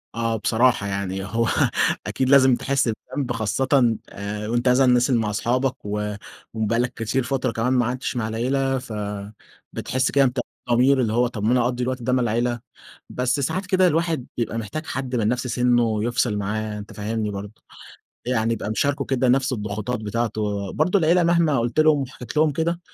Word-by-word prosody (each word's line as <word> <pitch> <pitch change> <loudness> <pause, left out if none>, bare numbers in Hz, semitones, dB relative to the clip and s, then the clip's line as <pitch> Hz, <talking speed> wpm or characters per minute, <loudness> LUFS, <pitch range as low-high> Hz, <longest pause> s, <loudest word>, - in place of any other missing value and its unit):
آه، 115 -1 0
بصراحة 110 -1 +2
يعني 95 -1 -3
هو 115 +4 0 0.6
أكيد 130 -1 -1
لازم 130 -2 +6
تحس 135 -1 0
بذنب، 130 +3 -4
خاصةً 115 +3 -1 0.5
وأنت 105 +5 -1
مثلًا 130 +1 +4
نازل 125 0 +3
مع 110 -2 0
أصحابك 125 +4 -1
و 105 0 -2 0.4
وبقى 110 +1 0
لك 125 +1 0
كتير 115 +3 -1
فترة 130 0 -1
كمان 125 +3 0
ما 125 -2 +3
قعدتش 125 +2 -3
مع 110 -3 -1
العيلة. 135 +4 0
فبتحس 105 +3 -5
كده 140 -1 +4
بتأنيب 125 - -1 0.3
ضمير، 130 +2 +4
اللي 110 -2 0
هو 120 +1 +3
طب 110 -4 -6
ما 115 - +2
أنا 125 -1 +3
أقضي 125 0 -1
الوقت 130 0 -2
ده 125 +2 0
مع 130 - +2
العيلة. 120 +1 0 0.5
بس 125 +3 0
ساعات 170 +8 -1
كده 185 -1 +3
الواحد 165 -5 0
بيبقى 115 -1 -2
محتاج 115 +9 -5
حد 130 -1 -4
من 110 -3 +1
نفس 125 +2 -1
سِنُّه 120 -3 +2
يفصل 120 -2 0
معاه، 105 +1 -3
أنت 105 - -10
فاهمني 105 0 -3
برضه. 100 +2 -8 0.7
يعني 115 -2 +1
يبقى 115 - -4
مشاركه 140 +6 0
كده 130 -1 +1
نفس 130 +1 +2
الضغوطات 110 +2 -3
بتاعته. 105 -2 -2
برضه، 180 +6 +2
العيلة 170 +2 +3
مهما 165 -6 +3
قلت 120 +6 -1
لهم 155 -2 +5
وحكيت 130 +2 -7
لهم 155 -1 +4
كده، 170 +3 -1
120 Hz, 180 wpm, -23 LUFS, 110-130 Hz, 0.7 s, لازم